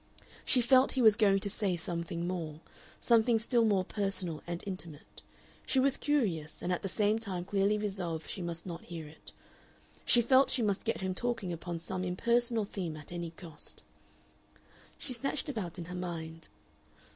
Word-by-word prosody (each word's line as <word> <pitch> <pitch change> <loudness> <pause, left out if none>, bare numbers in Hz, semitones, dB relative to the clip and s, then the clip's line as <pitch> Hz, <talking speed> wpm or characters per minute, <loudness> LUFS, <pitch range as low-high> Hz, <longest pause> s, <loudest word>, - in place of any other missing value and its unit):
She 250 - +5
felt 260 +2 +5
he 260 - +1
was 215 -2 +8
going 200 -3 +4
to - - -1
say 200 -2 0
something 170 0 -3
more 165 -4 -4 0.4
something 230 0 +4
still 235 +1 +2
more 200 -4 +3
personal 195 -6 -2
and 170 0 -4
intimate. 170 -6 -7 0.4
She 265 - +1
was 270 0 +4
curious, 185 - 0
and 180 - +1
at 180 - -2
the 195 - -3
same 210 +2 +2
time 185 -5 -2
clearly 200 +2 +2
resolved 185 -6 -3
she 190 - -5
must 170 -1 -5
not 170 -2 -6
hear 165 -3 -7
it. 155 +2 -13 0.7
She 240 - +5
felt 260 +3 +5
she 245 - +1
must 205 0 0
get 230 - -1
him 190 0 -1
talking 225 -4 -1
upon 170 +1 -4
some 180 +2 -4
impersonal 230 +4 +1
theme 175 -6 -4
at 150 +1 -11
any 170 -1 -4
cost. 165 -1 -10 1.1
She 255 - -2
snatched 275 +4 -2
about 190 - -4
in 175 - -5
her 180 - -7
mind. 165 -3 -5
190 Hz, 175 wpm, -32 LUFS, 170-225 Hz, 1.1 s, was